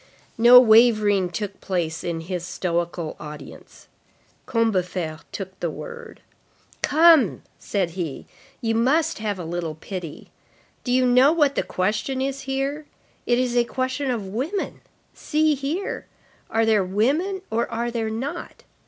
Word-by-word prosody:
No 240 +2 +10
wavering 215 -5 +5
took 200 +2 -5
place 170 -4 -2
in 170 -2 -3
his 175 +1 -4
stoical 175 -2 -3
audience. 150 -1 -11 0.6
Combeferre 180 -8 -1
took 190 -1 -7
the 170 - -1
word. 475 - -9 0.6
"Come," 305 - +5 0.2
said 190 -4 -1
he, 165 -5 -5 0.4
"you 225 -2 0
must 295 +8 +2
have 210 -2 -2
a 175 - -6
little 165 -1 -4
pity. 170 -1 -8 0.5
Do 245 - -2
you 255 0 +3
know 250 +3 +5
what 295 -4 +3
the - - 0
question 215 +8 -2
is 275 +1 -2
here? 275 +3 -2 0.4
It 240 - +3
is 250 -1 0
a 240 - +4
question 260 +3 -2
of 230 -5 -2
women. 265 - -3 0.3
See 310 0 +1
here. 295 +8 -3 0.4
Are 225 0 +2
there 215 -3 +3
women 290 - 0
or 230 +1 0
are 235 +1 -2
there 225 -2 -2
not? 240 +6 -5
225 Hz, 140 wpm, -23 LUFS, 185-270 Hz, 0.6 s, No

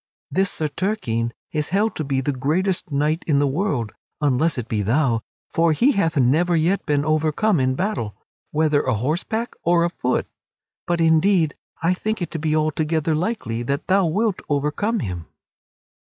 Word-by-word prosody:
This 195 0 +2
Sir 155 - -2
Turquine 140 - -1 0.2
is 150 -1 -1
held 210 +4 +1
to 155 - -2
be 135 -2 0
the 145 - 0
greatest 160 +7 -1
knight 150 +3 0
in 150 -3 +3
the 145 - +3
world 140 - -1 0.3
(unless 145 +2 +1
it 120 -2 -4
be 110 -2 -1
thou) 115 +2 +1 0.3
for 165 -1 +3
he 250 - +4
hath 165 - +1
never 155 +7 +3
yet 170 +5 +1
been 145 -1 +1
overcome 155 +5 +2
in 130 0 +1
battle, 180 - -2 0.3
whether 155 -1 +2
a 125 - 0
horseback 175 - -2
or 170 0 +3
a 170 - -1
foot. 125 -7 -1 0.6
But, 175 -1 +1
indeed, 165 0 +3 0.3
I 175 +2 +3
think 215 +4 -2
it 175 - -4
to 165 - -3
be 155 0 0
altogether 155 +1 0
likely 155 - -2
that 140 +5 -2
thou 190 -1 +3
wilt 205 +4 0
overcome 150 +10 0
him." 90 -4 -5
155 Hz, 170 wpm, -22 LUFS, 140-180 Hz, 0.6 s, he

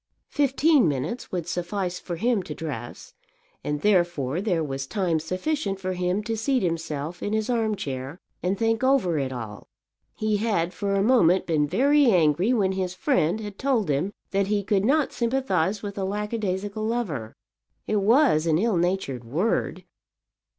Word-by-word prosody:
Fifteen 285 - +3
minutes 150 - -3
would 175 -3 -3
suffice 180 +1 -3
for 175 - -5
him 225 +3 +1
to 155 -4 -7
dress, 135 -8 -7 0.5
and 150 0 -2
therefore 175 -6 +1
there 180 -6 0
was 135 -2 -4
time 175 -4 0
sufficient 195 - -2
for 185 -1 -2
him 180 +3 -1
to 225 +1 -2
seat 250 +2 0
himself 165 -1 -3
in 205 - -2
his 220 +3 0
arm 225 -3 +1
chair 135 -2 -5 0.2
and 185 +2 0
think 225 +2 +1
over 255 - +2
it 135 -2 -2
all. 110 -5 -7 0.5
He 215 -1 0
had 200 -5 0
for 200 -1 -1
a 195 - +2
moment 190 -7 +4
been 155 -3 +1
very 280 - +4
angry 175 - +3
when 200 -6 +2
his 185 -1 -2
friend 210 - +1
had 205 -2 -8
told 250 - +1
him 145 +8 0 0.2
that 195 0 +1
he 205 0 0
could 200 -1 +1
not 290 +4 +2
sympathize 230 -6 0
with 200 -1 -5
a - - -1
lackadaisical 205 0 -2
lover. 200 - -3 0.5
It 215 - 0
was 205 - +4
an 160 -1 +3
ill 210 +1 +1
natured 170 -8 -1
word. 160 - -1
190 Hz, 165 wpm, -25 LUFS, 165-220 Hz, 0.5 s, moment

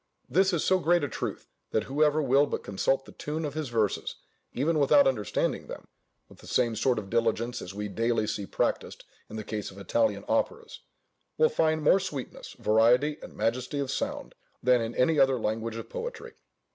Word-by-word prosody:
This 190 +2 +3
is 170 -4 0
so 185 0 +3
great 175 -2 +2
a - - +1
truth, - - -5 0.2
that 110 - 0
whoever 150 +3 +2
will 140 +2 +4
but - - -4
consult 135 +7 0
the - - -12
tune 155 +2 -4
of 145 - -4
his 155 -3 -3
verses, 110 -4 -1 0.4
even 155 +4 0
without 145 0 +5
understanding 110 -7 -1
them - - -9 0.4
(with - - -18
the - - -14
same 120 -3 +1
sort 125 +3 +1
of 105 -2 -4
diligence 115 +3 0
as 95 - -8
we 105 0 -3
daily 115 +2 0
see 100 -2 -3
practised - - -2 0.3
in 110 - -8
the 110 - -4
case 105 -1 -4
of 95 - -14
Italian 280 - 0
operas), 460 -1 -1 0.6
will 470 - +5
find 155 - +1
more 185 +6 +5
sweetness, 150 -9 -6
variety, 120 +7 +3
and - - -11
majesty 125 +5 -1
of 140 -2 -2
sound, - - -3 0.3
than 125 -1 +4
in 115 +1 -4
any 150 +4 +3
other 135 -1 +4
language 110 +1 -2
of 115 - -6
poetry. 475 -1 -6
130 Hz, 190 wpm, -28 LUFS, 115-155 Hz, 0.6 s, without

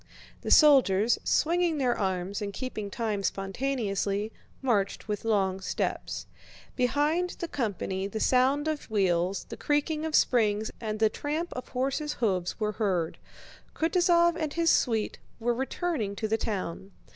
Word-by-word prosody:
The - - -4
soldiers, 240 -8 +6
swinging 340 0 +2
their 250 -4 +1
arms 190 0 -2
and 205 -1 -3
keeping 215 -3 -5
time 210 -1 -2
spontaneously, 200 0 -1 0.3
marched 210 -7 0
with 210 -1 -3
long 195 -4 +1
steps. - - -3 0.5
Behind 295 +8 +1
the 340 - -4
company 195 - -2
the 220 +2 -4
sound 265 +6 +3
of 310 -2 -3
wheels, 185 -3 +1
the - - -7
creaking 300 +1 0
of 320 -1 -1
springs, 215 -3 +2
and 215 -2 -3
the 220 0 +3
tramp 310 +8 -3
of 250 - -6
horses' 275 +4 -1
hoofs 185 -8 -1
were 215 -1 0
heard. 190 -6 -1 0.6
Kutúzov 340 0 +3
and 310 -3 -2
his 335 -1 +3
suite 225 -3 +1 0.2
were 240 +1 +1
returning 265 - -2
to 220 - -2
the 220 - +1
town. 195 -3 -4
225 Hz, 145 wpm, -28 LUFS, 200-290 Hz, 0.6 s, soldiers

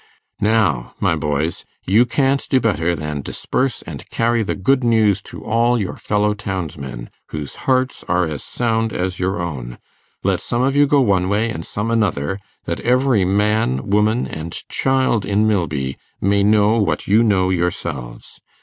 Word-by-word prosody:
'Now, 100 - +1
my - - +2
boys! 75 +2 -2 0.2
you 110 +6 +4
can't 135 +3 +1
do 130 - +4
better 85 -7 +1
than 75 -1 -4
disperse 130 - -2
and - - -9
carry 115 0 +1
the 105 - -1
good 130 +7 +2
news 110 -4 +3
to - - -10
all 115 +2 +2
your 100 - -3
fellow 105 0 0
townsmen, 75 -12 -5 0.2
whose 75 -2 -6
hearts 130 0 +1
are 90 +1 +2
as 75 -4 -5
sound 115 -2 -1
as 90 0 -2
your 95 0 -1
own. 65 -8 -5 0.5
Let - - +1
some 120 +1 -1
of 135 +1 +1
you 145 0 +5
go 145 0 +4
one 95 -6 +2
way 110 +3 +1
and 80 - -5
some 105 +6 -3
another, 100 -6 0 0.2
that - - -3
every 125 -4 +2
man, 100 - +1
woman, 105 +3 +2
and 80 +2 -6 0.2
child 130 -5 +1
in 105 +2 +1
Milby 75 -10 -1 0.2
may 100 +1 +2
know 105 +2 +4
what 100 - -1
you 105 +4 +5
know 95 -5 +2
yourselves. 70 -9 -3
100 Hz, 165 wpm, -19 LUFS, 85-115 Hz, 0.5 s, you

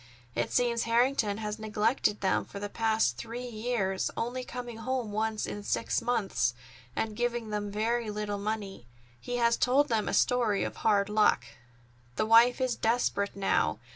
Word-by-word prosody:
It 120 0 -1
seems 235 -2 +1
Harrington 230 -2 +2
has 210 -1 -4
neglected 215 +1 0
them 190 - +2
for 200 - -8
the 205 0 -4
past 220 - +1
three 235 - -6
years, 215 -5 -1
only 245 +2 -2
coming 245 -2 -7
home 245 -1 -2
once 220 +1 -1
in 205 - -5
six 205 - -1
months, 195 - 0 0.4
and 220 -1 -2
giving 240 -1 -2
them 205 -1 -2
very 225 +2 -1
little 210 -1 -3
money. 200 - -4 0.3
He 245 - -4
has 235 -1 +3
told 275 +3 +3
them 220 -3 0
a - - 0
story 235 -5 +2
of - - -4
hard 200 -2 +2
luck. 210 - +3 0.7
"The - - +1
wife 230 +3 +6
is 255 -2 0
desperate 220 -3 0
now. 195 -1 +1
220 Hz, 165 wpm, -29 LUFS, 205-240 Hz, 0.7 s, wife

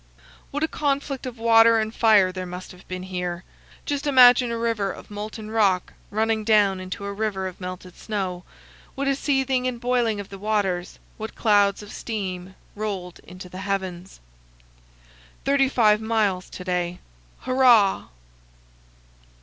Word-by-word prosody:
What 290 +2 -3
a - - +2
conflict 280 -3 -2
of 245 -1 -7
water 230 0 +5
and 220 0 -1
fire 210 -6 +4
there 185 0 -6
must 180 +1 -8
have 180 0 -16
been 185 0 -5
here! 180 -1 -4 0.4
Just 290 0 -2
imagine 250 -2 +7
a 230 - -2
river 225 -4 -1
of - - -12
molten 215 +1 -7
rock 200 -5 +1 0.2
running 220 +1 0
down 205 -3 +3
into 185 +2 -6
a 200 - -4
river 200 -2 -2
of 185 0 -7
melted 180 0 -7
snow. 190 -5 -4 0.5
What 275 0 -2
a 275 - +3
seething 265 -2 0
and 245 -2 -3
boiling 240 -3 0
of 200 - -7
the 195 - -9
waters; 195 -4 -1 0.2
what 220 0 -7
clouds 205 -2 +3
of 205 - -11
steam 190 -4 -5 0.2
rolled 195 -4 -5
into 185 +1 -11
the 185 +1 -9
heavens! 190 -2 -4 1.3
Thirty 275 -1 +3
five 215 -5 +3
miles 215 -5 0
to 180 - -8
day. 180 -1 -2 0.4
Hurrah! 245 -6 +4
210 Hz, 150 wpm, -24 LUFS, 185-235 Hz, 1.3 s, imagine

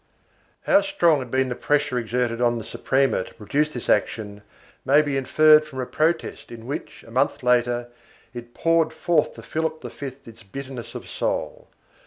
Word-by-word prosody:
How 295 - +5
strong 175 - +2
had 130 -2 -6
been 130 +1 +1
the - - -1
pressure 145 0 0
exerted 120 0 -1
on 120 -1 +2
the 115 - -6
Suprema 135 -7 +1
to - - -14
produce 145 +8 0
this 125 -5 -7
action 105 0 0 0.4
may 145 +3 +5
be 145 -2 -2
inferred 155 +3 +5
from 145 -4 -9
a 130 - -1
protest 160 +6 -1
in 115 -1 -10
which, 140 +4 -6
a 115 - -15
month 130 +3 0
later, 120 -1 +2 0.5
it 120 -1 -9
poured 165 -1 +2
forth 160 0 +1
to - - -11
Philip 160 0 -3
V 140 - -6 0.2
its 115 0 -13
bitterness 130 +3 -8
of - - -7
soul. - - -3
130 Hz, 175 wpm, -23 LUFS, 120-155 Hz, 0.5 s, How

